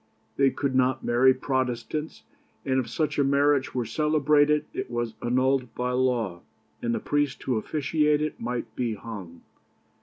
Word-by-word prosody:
They 135 +1 +4
could 135 0 -2
not 130 0 +2
marry 120 +2 +5
Protestants, 130 +3 -2 0.4
and 130 -1 +2
if 120 -3 -3
such 150 +5 -1
a - - +5
marriage 140 -1 +2
were 125 -2 0
celebrated 150 +3 +2
it - - -4
was 120 -1 -2
annulled 130 +1 +1
by 125 0 -1
law, 120 -8 0 0.4
and 115 0 0
the - - -1
priest 145 -4 -1
who 130 - 0
officiated 150 +4 0
might 120 +1 -4
be 120 -3 -1
hung. 95 -6 -9
130 Hz, 150 wpm, -26 LUFS, 120-145 Hz, 0.4 s, marry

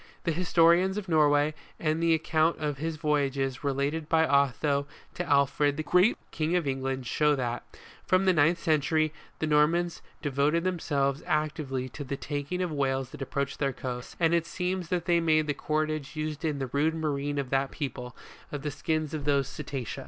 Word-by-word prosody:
The 170 - +1
historians 175 +3 +3
of 205 -2 -4
Norway, 150 -2 +3 0.3
and 155 0 0
the 165 -1 +4
account 160 +1 +1
of 150 -3 -3
his 160 +1 -2
voyages 140 -4 0
related 140 +3 -1
by 160 0 +4
Otho 140 0 +2 0.3
to 175 - -3
Alfred 145 -1 +2
the 155 - -2
Great, 180 +8 +4
King 160 +2 0
of 175 -3 +1
England, 135 -1 -2
show 150 +4 +2
that, 120 -2 -3 0.4
from 185 +1 +2
the 185 - +5
ninth 165 +2 +4
century, 155 -1 +1 0.2
the - - -1
Normans 160 +3 +2 0.2
devoted 145 +3 +1
themselves 145 -6 0
actively 150 -4 -1
to 145 - -7
the 140 0 -4
taking 145 +6 -3
of 175 - -2
whales 135 -3 -1
that - - -10
approached 140 0 -3
their 140 -2 0
coasts, 125 -1 -6
and 165 -1 +3
it 170 -1 +1
seems 180 -1 -3
that 175 -2 -1
they 170 -1 +3
made 155 -2 +3
the 150 - 0
cordage 155 0 -2
used 155 +1 -4
in 155 -3 0
the 135 -3 -4
rude 155 +3 +2
marine 145 -2 -2
of 140 -3 -3
that 135 0 +1
people, 125 -4 -5 0.4
of 145 -1 -5
the 150 - -2
skins 155 +1 -2
of 150 -3 -4
these 140 -2 +2
cetacea. 135 -5 -5
150 Hz, 185 wpm, -28 LUFS, 140-165 Hz, 0.4 s, the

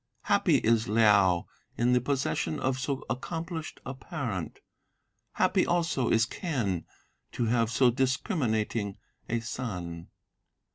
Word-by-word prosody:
Happy - - +3
is 115 +1 +2
Liao 100 -5 +4 0.3
in 120 +1 +3
the 125 - +4
possession 140 +3 -1
of 130 0 0
so 135 +1 -3
accomplished 160 +5 -4
a 130 - -4
parent, 130 - -5 0.8
Happy - - +3
also 170 -7 +1
is 110 0 +4
Quen 115 - -2 0.5
to 120 - -1
have 115 0 +2
so 120 +2 +4
discriminating 120 - 0 0.3
a 115 - +1
son. 90 -9 -5
120 Hz, 115 wpm, -29 LUFS, 110-135 Hz, 0.8 s, Liao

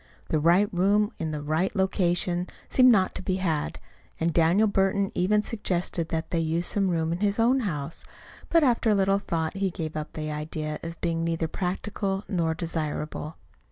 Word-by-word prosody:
The 155 - +2
right 175 +6 +4
room 205 +4 +3
in 160 - -2
the 150 -1 -4
right 160 +7 0
location 180 -2 +1 0.2
seemed 255 -1 +6
not 190 -5 +3
to - - -5
be 185 0 -1
had; 165 -6 -1 0.4
and 165 0 +1
Daniel 175 +7 +4
Burton 195 0 +1
even 210 +4 +2
suggested 180 -6 -2
that 160 -1 -3
they 170 - +1
use 165 +2 0
some 195 0 +1
room 165 -2 0
in 170 - -3
his 205 0 +1
own 240 +4 +3
house. 165 - -3 0.5
But 330 -2 +4
after 240 -4 +3
a 210 - +4
little 195 0 +3
thought 165 -4 -2
he 195 -1 +1
gave 160 -4 -5
up 155 0 -5
this 155 -1 -4
idea 155 0 -4
as 165 0 -6
being 165 0 -1
neither 165 -1 -1
practical 195 +3 -3
nor 165 -5 0
desirable. 155 -2 -4
175 Hz, 185 wpm, -26 LUFS, 160-195 Hz, 0.5 s, seemed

